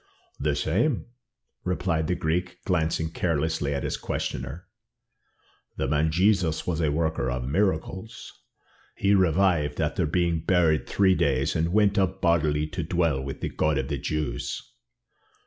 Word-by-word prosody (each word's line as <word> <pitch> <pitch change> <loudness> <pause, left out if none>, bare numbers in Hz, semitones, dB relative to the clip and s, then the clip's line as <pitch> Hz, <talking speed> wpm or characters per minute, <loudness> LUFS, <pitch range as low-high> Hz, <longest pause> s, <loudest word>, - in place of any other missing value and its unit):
"The 75 0 0
same," 100 - 0 0.6
replied 90 -3 0
the 90 - +1
Greek, 90 +3 -1
glancing 80 -2 0
carelessly 80 -3 -1
at 70 - -3
his - - -2
questioner. 65 +8 -4 1.1
"The - - -1
man 75 +3 +2
Jesus 90 -1 +2
was 85 -2 -1
a 75 -2 +2
worker 80 -2 0
of 60 0 -3
miracles. 95 - -2 0.6
He 100 +1 +2
revived 90 -6 +2
after - - 0
being 85 +1 +1
buried 80 -2 +2
three 95 -2 +3
days, 70 -4 +1
and 80 +1 +1
went 105 +1 +3
up 95 0 0
bodily 75 -4 +2
to 90 +1 -4
dwell 80 -4 0
with 70 0 -6
the - - -2
God 75 -2 0
of 65 0 -2
the 70 - -2
Jews." 75 +2 -3
80 Hz, 145 wpm, -26 LUFS, 75-90 Hz, 1.1 s, three